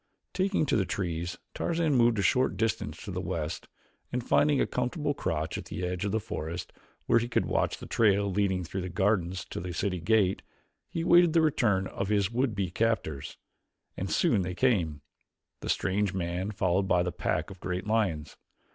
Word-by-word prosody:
Taking 190 Hz, -3 st, +1 dB
to -, -, +1 dB
the 100 Hz, -, +3 dB
trees 90 Hz, -2 st, -3 dB, 0.2 s
Tarzan 165 Hz, -3 st, 0 dB
moved 120 Hz, -3 st, +4 dB
a 100 Hz, -, +1 dB
short 130 Hz, +5 st, +2 dB
distance 115 Hz, -2 st, -2 dB
to -, -, -6 dB
the -, -, -3 dB
west 80 Hz, 0 st, -4 dB, 0.4 s
and, 125 Hz, -1 st, -3 dB
finding 145 Hz, -1 st, +4 dB
a -, -, +3 dB
comfortable 145 Hz, +4 st, -1 dB
crotch 80 Hz, -, -2 dB
at -, -, -9 dB
the 90 Hz, -, -4 dB
edge 90 Hz, +2 st, -2 dB
of 100 Hz, -, -1 dB
the 110 Hz, -, +1 dB
forest 85 Hz, -6 st, -5 dB, 0.3 s
where 115 Hz, -, +4 dB
he 120 Hz, -, -2 dB
could -, -, +1 dB
watch -, -, 0 dB
the -, -, -9 dB
trail 100 Hz, -2 st, +3 dB
leading 95 Hz, -1 st, 0 dB
through 95 Hz, +3 st, -4 dB
the 90 Hz, -, -4 dB
gardens 95 Hz, 0 st, 0 dB
to -, -, -3 dB
the 90 Hz, 0 st, -5 dB
city 90 Hz, -1 st, -1 dB
gate, 95 Hz, +2 st, +2 dB, 0.5 s
he 165 Hz, -, -3 dB
awaited 175 Hz, -1 st, +5 dB
the 165 Hz, -, +5 dB
return 110 Hz, -11 st, +2 dB
of 100 Hz, -, -3 dB
his 100 Hz, -1 st, +2 dB
would 120 Hz, -2 st, 0 dB
be 95 Hz, -3 st, -1 dB
captors. 95 Hz, -10 st, -1 dB, 0.6 s
And -, -, -4 dB
soon 100 Hz, -, +3 dB
they 90 Hz, 0 st, -3 dB
came 90 Hz, -, +1 dB, 0.6 s
the -, -, -6 dB
strange 95 Hz, 0 st, 0 dB
man 90 Hz, +2 st, -2 dB
followed 95 Hz, -2 st, +1 dB
by 90 Hz, -2 st, +3 dB
the 90 Hz, -, -2 dB
pack 80 Hz, +1 st, -2 dB
of 95 Hz, -, -11 dB
great 90 Hz, +1 st, -3 dB
lions. 105 Hz, -9 st, 0 dB
100 Hz, 190 wpm, -29 LUFS, 90-115 Hz, 0.6 s, awaited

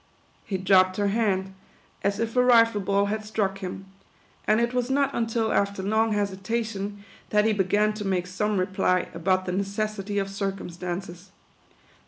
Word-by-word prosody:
He 195 Hz, -, -2 dB
dropped 185 Hz, 0 st, +4 dB
her 205 Hz, -1 st, +1 dB
hand, 195 Hz, -3 st, 0 dB, 0.5 s
as 200 Hz, +1 st, 0 dB
if 230 Hz, +1 st, -2 dB
a 250 Hz, -, +5 dB
rifle 230 Hz, -4 st, +5 dB
ball 200 Hz, +1 st, +2 dB
had 215 Hz, +1 st, -2 dB
struck 205 Hz, -2 st, -2 dB
him; 190 Hz, 0 st, -6 dB, 0.6 s
and 215 Hz, +1 st, +4 dB
it 235 Hz, +1 st, 0 dB
was 250 Hz, 0 st, 0 dB
not 275 Hz, 0 st, +1 dB
until 225 Hz, -1 st, 0 dB
after 200 Hz, -1 st, 0 dB
long 220 Hz, +2 st, +2 dB
hesitation, 205 Hz, 0 st, -3 dB, 0.3 s
that 210 Hz, 0 st, +3 dB
he 220 Hz, -, +3 dB
began 210 Hz, +2 st, +2 dB
to 210 Hz, 0 st, -5 dB
make 185 Hz, -3 st, 0 dB
some 205 Hz, +3 st, -1 dB
re 185 Hz, -, +2 dB
ply 185 Hz, -1 st, 0 dB
about 185 Hz, +3 st, +1 dB
the 180 Hz, -, -2 dB
necessity 200 Hz, +1 st, -2 dB
of 195 Hz, -1 st, 0 dB
circumstances. 185 Hz, -2 st, -5 dB
200 Hz, 165 wpm, -26 LUFS, 190-220 Hz, 0.6 s, a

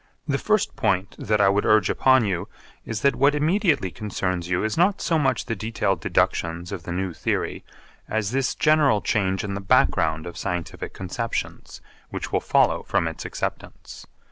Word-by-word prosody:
The 140 Hz, -2 st, 0 dB
first 215 Hz, -2 st, +1 dB
point 95 Hz, -3 st, 0 dB
that 105 Hz, 0 st, 0 dB
I 100 Hz, -, +5 dB
would 100 Hz, +1 st, +2 dB
urge 110 Hz, -4 st, +4 dB
upon 130 Hz, -3 st, +4 dB
you 90 Hz, -4 st, -2 dB, 0.4 s
is 110 Hz, -2 st, -4 dB
that 140 Hz, -, +3 dB
what 145 Hz, +2 st, +3 dB
immediately 160 Hz, -, +1 dB
concerns 90 Hz, -4 st, -3 dB
you 90 Hz, 0 st, 0 dB
is 110 Hz, 0 st, -1 dB
not 185 Hz, +4 st, +3 dB
so 165 Hz, -2 st, +1 dB
much 145 Hz, -, 0 dB
the 115 Hz, -, -2 dB
detailed 100 Hz, -4 st, -1 dB
deductions 85 Hz, +3 st, 0 dB
of 95 Hz, -4 st, -5 dB
the -, -, -5 dB
new 95 Hz, 0 st, -2 dB
theory -, -, -2 dB, 0.5 s
as 110 Hz, -1 st, -1 dB
this 135 Hz, 0 st, 0 dB
general 150 Hz, -8 st, +3 dB
change 95 Hz, -3 st, 0 dB
in 100 Hz, -1 st, -3 dB
the 100 Hz, -, -4 dB
background 80 Hz, -4 st, +2 dB
of 85 Hz, -, -7 dB
scientific 90 Hz, -4 st, -4 dB
conceptions 115 Hz, +5 st, -5 dB, 0.3 s
which -, -, -5 dB
will -, -, +2 dB
follow -, -, +2 dB
from -, -, 0 dB
its -, -, -6 dB
acceptance. -, -, -6 dB
105 Hz, 175 wpm, -24 LUFS, 95-135 Hz, 0.5 s, I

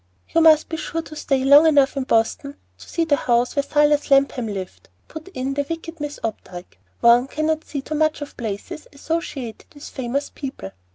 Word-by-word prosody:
"You 330 Hz, -, +2 dB
must 315 Hz, -1 st, +6 dB
be 320 Hz, -, -4 dB
sure 330 Hz, +1 st, -4 dB
to 310 Hz, -, -11 dB
stay 275 Hz, -3 st, -1 dB
long 285 Hz, +4 st, +7 dB
enough 285 Hz, -3 st, +4 dB
in 270 Hz, -2 st, -2 dB
Boston 245 Hz, +5 st, 0 dB, 0.2 s
to -, -, -14 dB
see 335 Hz, -, 0 dB
the 305 Hz, -3 st, +3 dB
house 245 Hz, -2 st, 0 dB
where 280 Hz, -, +3 dB
Silas 295 Hz, +1 st, +2 dB
Lapham 275 Hz, -3 st, +3 dB
lived," 195 Hz, -3 st, -7 dB, 0.2 s
put 315 Hz, +2 st, -10 dB
in 275 Hz, -7 st, -4 dB
the 285 Hz, +1 st, -1 dB
wicked 330 Hz, 0 st, -6 dB
Miss 295 Hz, 0 st, -5 dB
Opdyke. 185 Hz, -5 st, -7 dB, 0.2 s
"One 240 Hz, +2 st, +5 dB
cannot 310 Hz, +2 st, -1 dB
see 280 Hz, -2 st, -5 dB
too 310 Hz, -, -6 dB
much 310 Hz, 0 st, +1 dB
of 290 Hz, -, -11 dB
places 220 Hz, +6 st, -6 dB
associated 280 Hz, -6 st, -5 dB
with 290 Hz, -, -10 dB
famous 265 Hz, +2 st, -3 dB
people." 260 Hz, -, -7 dB
280 Hz, 190 wpm, -21 LUFS, 250-310 Hz, 0.2 s, long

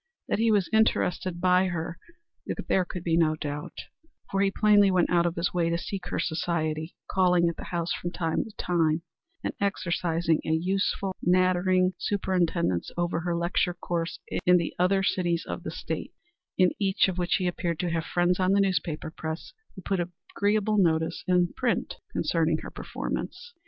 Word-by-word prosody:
That -, -, 0 dB
he 230 Hz, 0 st, +3 dB
was 200 Hz, -4 st, +3 dB
interested 185 Hz, -5 st, +1 dB
by 185 Hz, +1 st, +4 dB
her 170 Hz, -1 st, -4 dB, 0.7 s
there 185 Hz, -1 st, +2 dB
could 180 Hz, -1 st, -6 dB
be 165 Hz, -2 st, +1 dB
no 160 Hz, -2 st, +3 dB
doubt, 150 Hz, -1 st, -5 dB, 0.5 s
for 195 Hz, -, +1 dB
he 200 Hz, -, +4 dB
plainly 205 Hz, 0 st, +5 dB
went 185 Hz, -2 st, +2 dB
out 175 Hz, -1 st, +4 dB
of 170 Hz, -, -2 dB
his 170 Hz, +1 st, -1 dB
way 170 Hz, -2 st, +1 dB
to 170 Hz, -, +1 dB
seek 190 Hz, +2 st, -5 dB
her -, -, -3 dB
society, 160 Hz, -1 st, -2 dB
calling 180 Hz, -2 st, +3 dB
at 170 Hz, -, -1 dB
the -, -, -8 dB
house 170 Hz, -1 st, -2 dB
from 175 Hz, -, -3 dB
time 165 Hz, -2 st, -1 dB
to 225 Hz, -, -10 dB
time, 165 Hz, -2 st, +1 dB, 0.4 s
and -, -, -2 dB
exercising 170 Hz, -4 st, 0 dB
a -, -, -4 dB
useful, 190 Hz, +3 st, 0 dB
nattering 185 Hz, +1 st, +3 dB
superintendence 175 Hz, -, 0 dB
over 175 Hz, -1 st, 0 dB
her 170 Hz, 0 st, -1 dB
lecture 175 Hz, +1 st, 0 dB
course 170 Hz, -2 st, -3 dB, 0.3 s
in 180 Hz, 0 st, +6 dB
the 170 Hz, -2 st, -2 dB
other 195 Hz, +2 st, +3 dB
cities 175 Hz, -3 st, 0 dB
of -, -, -4 dB
the -, -, -5 dB
State, -, -, -5 dB, 0.4 s
in 185 Hz, -1 st, +5 dB
each 195 Hz, -1 st, +3 dB
of 185 Hz, -1 st, -3 dB
which 175 Hz, -1 st, +1 dB
he 185 Hz, -, 0 dB
appeared 175 Hz, -2 st, -1 dB
to 175 Hz, -2 st, -1 dB
have 165 Hz, -1 st, 0 dB
friends 175 Hz, +2 st, +1 dB
on 185 Hz, +1 st, +3 dB
the 200 Hz, -, +4 dB
newspaper 175 Hz, -5 st, 0 dB
press 160 Hz, -, -6 dB, 0.2 s
who 190 Hz, -, -10 dB
put 195 Hz, -2 st, -1 dB
agreeable 205 Hz, +4 st, 0 dB
notices 160 Hz, -2 st, +1 dB
in 180 Hz, -1 st, +2 dB
print 245 Hz, -2 st, -1 dB
concerning -, -, +1 dB
her -, -, -7 dB
performance. 480 Hz, 0 st, -5 dB
175 Hz, 175 wpm, -27 LUFS, 170-190 Hz, 0.7 s, in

